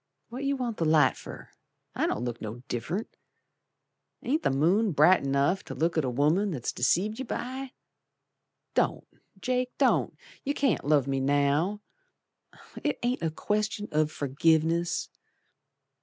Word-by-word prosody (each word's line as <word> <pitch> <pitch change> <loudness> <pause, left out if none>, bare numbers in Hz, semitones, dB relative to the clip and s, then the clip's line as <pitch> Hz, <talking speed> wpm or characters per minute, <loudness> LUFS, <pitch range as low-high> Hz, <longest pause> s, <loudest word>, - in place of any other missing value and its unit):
What 255 +4 -5
you 280 0 +1
want 245 -4 -3
the 165 - 0
light 155 -4 +4
fer? - - -10 0.4
I - - 0
don't - - -2
look 120 -1 -4
no 110 +3 -6
diff'rent. 145 - -4 1.1
Ain't 300 +6 0
the - - +1
moon 175 +9 +2
bright 155 +5 +5
enough 140 +7 +1
To - - -7
look 165 +1 0
at 160 - +2
a 130 - 0
woman 150 +11 +2
that's 135 -10 -3
deceived 200 - +1
yer 265 - -3
by? 260 +2 -5 1.0
Don't, - - 0 0.3
Jake, 250 +2 -1
don't, - - +2 0.3
you 285 +1 -1
can't 270 -4 +1
love 145 -3 +3
me 135 -1 -1
now! 145 +8 +1 1.0
It 295 - 0
ain't 245 +1 0
a 165 - 0
question 210 +5 -2
of 155 0 +1
forgiveness. 160 +4 +1
165 Hz, 145 wpm, -28 LUFS, 140-220 Hz, 1.1 s, bright